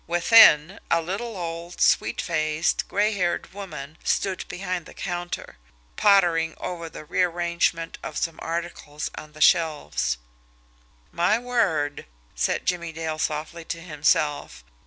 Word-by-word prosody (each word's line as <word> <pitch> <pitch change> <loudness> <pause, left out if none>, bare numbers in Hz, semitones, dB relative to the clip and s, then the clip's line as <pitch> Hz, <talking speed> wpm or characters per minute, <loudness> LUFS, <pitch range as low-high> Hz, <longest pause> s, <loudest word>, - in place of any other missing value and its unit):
Within, 175 -1 +6
a 170 - +3
little, 200 +6 -4
old, 170 0 -6
sweet - - +3
faced, 155 0 0
gray 210 +2 +1
haired 180 -3 -1
woman 160 -7 -8
stood 190 -2 0
behind 180 -2 -4
the - - -13
counter, 175 - -5 0.4
pottering 175 -6 +3
over 170 -2 -5
the 155 - -10
rearrangement 170 -1 0
of - - -6
some 165 -1 -2
articles 165 -3 -4
on 155 0 -10
the 155 - -12
shelves. 150 - +2 0.9
"My 175 +6 +2
word!" 195 - 0 0.3
said - - -1
Jimmie 170 -2 -1
Dale 160 -1 -4
softly 155 +2 -3
to 165 - -4
himself. 150 - 0
170 Hz, 125 wpm, -25 LUFS, 155-180 Hz, 0.9 s, Within